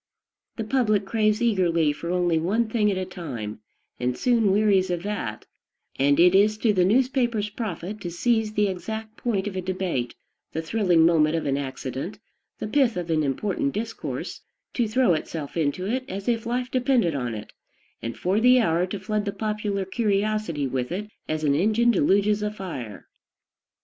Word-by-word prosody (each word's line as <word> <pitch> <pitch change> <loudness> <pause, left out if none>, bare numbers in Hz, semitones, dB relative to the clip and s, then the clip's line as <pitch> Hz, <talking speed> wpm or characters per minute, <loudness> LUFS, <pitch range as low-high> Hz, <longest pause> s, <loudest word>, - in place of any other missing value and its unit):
The 225 - -3
public 215 -4 +1
craves 215 +2 +1
eagerly 170 -9 +2
for 170 +3 -6
only 175 -2 +2
one 210 +8 +1
thing 220 -2 +2
at 195 - 0
a 185 - -2
time, 125 - -6 0.4
and 125 0 -1
soon 230 -5 +3
wearies 195 -2 +3
of 175 -1 -2
that; 160 - -4 0.5
and 140 +1 +3
it 180 +1 +6
is 210 +2 +4
to 215 -1 +2
the 185 -2 +3
newspaper's 240 0 +1
profit 210 -2 -5
to 175 - -4
seize 220 +4 0
the 210 -1 +2
exact 220 +4 -5
point 210 -6 -1
of 205 -2 -4
a 185 - -1
debate, 180 -9 -2 0.4
the 160 - -1
thrilling 175 -3 +3
moment 160 -2 +4
of 165 - -2
an 135 - +1
accident, 135 +4 -4 0.4
the - - -4
pith 245 -3 +2
of 175 -2 -3
an 155 -1 +2
important 200 - -1
discourse; 225 +2 -4 0.3
to 240 -3 +1
throw 230 -3 +3
itself 155 -2 -4
into 165 +3 0
it 255 +6 -1
as 195 +1 -5
if 230 -1 0
life 245 +1 -2
depended 250 - +2
on 125 -5 -2
it, 105 0 -9 0.5
and 115 0 -5
for 190 +4 +1
the 250 +2 +6
hour 175 -4 +2
to 195 +2 -5
flood 210 +2 -2
the 200 - -1
popular 210 -1 -2
curiosity 205 - 0
with 130 0 -2
it 210 +4 -4 0.2
as 155 0 -1
an 145 -2 +3
engine 220 +9 +3
deluges 205 +2 +2
a 210 - 0
fire. 165 - -7
195 Hz, 180 wpm, -25 LUFS, 165-220 Hz, 0.5 s, it